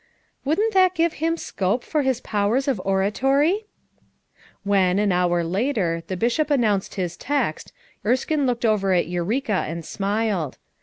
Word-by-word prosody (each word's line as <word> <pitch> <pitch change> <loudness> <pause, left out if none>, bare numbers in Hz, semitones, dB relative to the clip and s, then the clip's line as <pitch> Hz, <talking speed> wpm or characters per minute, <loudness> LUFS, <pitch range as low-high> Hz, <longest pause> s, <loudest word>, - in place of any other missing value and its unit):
"Wouldn't 410 +11 +1
that 370 -1 +4
give 330 -1 +2
him 330 +1 +1
scope 205 - -1
for 305 - 0
his 265 -3 0
powers 215 +6 0
of 260 -9 0
oratory?" 270 - +1 1.0
When, 195 -2 +2
an 205 -1 +2
hour 175 -1 +2
later, 185 -2 0
the 185 - -3
Bishop 245 - +1
announced 220 -9 +1
his 180 -3 -3
text, 285 +1 -2 0.3
Erskine 260 +5 +1
looked 245 0 -1
over 200 -4 +2
at 175 -3 +2
Eureka 190 +5 -1
and 165 0 -5
smiled. 200 - -1
215 Hz, 145 wpm, -23 LUFS, 190-280 Hz, 1.0 s, that